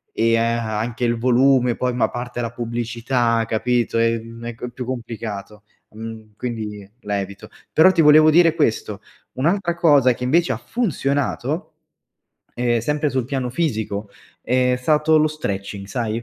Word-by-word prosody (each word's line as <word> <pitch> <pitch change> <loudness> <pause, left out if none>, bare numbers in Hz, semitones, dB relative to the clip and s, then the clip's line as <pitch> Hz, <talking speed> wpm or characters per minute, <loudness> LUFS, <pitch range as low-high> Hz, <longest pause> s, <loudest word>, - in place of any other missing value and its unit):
e 115 0 +3
a 115 -1 0
anche 120 +2 -2
il 120 0 +1
volume, 125 0 +3
poi 125 0 -1
ma 120 - +2
parte 125 0 -6
la 115 -1 -2
pubblicità, 115 0 -1
capito, 120 +1 0
ehm, 115 0 -1
è 120 - -4
c 125 +1 -6
più 125 0 -6
complicato, 110 -4 -6 0.3
mhmm, 110 -1 -9
quindi 105 -5 -5
la 105 -2 -2
evito. 100 +1 -7 0.2
Però 160 +4 +6
ti 170 -3 +2
volevo 155 0 +7
dire 165 0 +5
questo, 110 -7 -1 0.3
un’altra 170 +6 0
cosa 145 -7 +4
che 125 - -8
invece 165 +7 +2
ha - - -4
funzionato, 145 - -2 0.8
ehm, 120 -1 +1
sempre 150 +4 -1
sul 130 -3 -1
piano 130 -2 -2
fisico 110 -8 -2 0.3
è 125 +1 +2
stato 155 +4 +3
lo 155 - +3
stretching 100 -9 -5
sai, 115 0 -3
120 Hz, 150 wpm, -21 LUFS, 115-135 Hz, 0.8 s, volevo